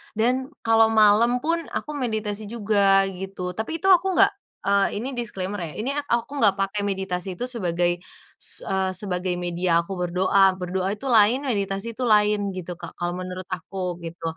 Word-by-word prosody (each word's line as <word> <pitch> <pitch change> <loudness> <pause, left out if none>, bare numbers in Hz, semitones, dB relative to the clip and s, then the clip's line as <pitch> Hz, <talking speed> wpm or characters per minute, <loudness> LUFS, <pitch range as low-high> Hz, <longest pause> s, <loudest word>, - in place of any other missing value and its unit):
Dan 250 +4 +1 0.2
kalau 225 0 +5
malam 225 +3 +4
pun 335 +2 +1
aku 300 - -5
meditasi 215 -4 -3
juga 200 -3 +3
gitu, 185 -1 -5
tapi 220 - -4
itu 385 - +4
aku 370 +1 +5
enggak 395 +3 +6 0.3
eee, 200 0 +2
ini 240 +6 -3
disclaimer 205 -5 -4
ya, 165 -4 -6
ini 240 +6 -2
ak 285 0 -3
aku 235 +5 -1
enggak 205 -5 +4
pakai 200 +1 -2
meditasi 190 -1 -3
itu 210 - -5
sebagai 175 -5 0 0.4
s - - +1
eee, 190 -1 -1
sebagai 180 -2 -2
media 175 -1 +1
aku 180 - -11
berdoa. 185 +2 +3
Berdoa 185 +1 -2
itu 210 - -18
lain, 230 +4 +4
meditasi 200 -3 -2
itu 250 +3 -4
lain 210 -1 +3
gitu, 180 -1 -6
Kak, 170 - -9
kalau 175 0 -2
menurut 185 +1 -6
aku 180 0 -4
gitu. 165 0 -9
200 Hz, 175 wpm, -24 LUFS, 180-225 Hz, 0.4 s, enggak